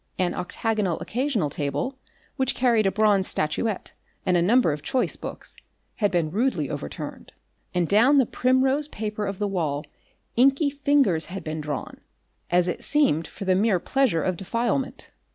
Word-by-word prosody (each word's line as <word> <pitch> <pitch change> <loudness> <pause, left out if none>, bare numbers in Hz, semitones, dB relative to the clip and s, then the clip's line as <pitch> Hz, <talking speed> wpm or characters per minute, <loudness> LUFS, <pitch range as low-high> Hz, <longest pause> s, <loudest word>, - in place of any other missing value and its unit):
An 180 -1 0
octagonal 200 -1 -1
occasional 235 - -1
table, 145 - -2 0.4
which 265 -2 0
carried 235 -5 +3
a - - +2
bronze 205 -2 +3
statuette 190 +7 -1 0.3
and 180 - +2
a 175 - +4
number 215 0 +4
of 150 - -6
choice 260 - 0
books, - - -8 0.4
had 205 -2 +2
been 170 -4 0
rudely 200 - 0
overturned, 75 - -7 0.4
and 175 -2 +2
down 235 - +5
the 265 - +5
primrose 265 +5 +2
paper 215 -5 -4
of 195 -1 -4
the 205 - -1
wall 155 -7 -2 0.5
inky 275 +4 +4
fingers 280 - +2
had 195 +2 -6
been 155 0 -4
drawn, 145 -2 -5 0.5
as 175 0 +3
it 175 - -3
seemed 275 - +2
for 195 - -8
the 185 - +3
mere 200 +1 +3
pleasure 250 -7 +1
of 185 -2 -1
defilement. 235 +7 -2
205 Hz, 160 wpm, -25 LUFS, 175-255 Hz, 0.5 s, down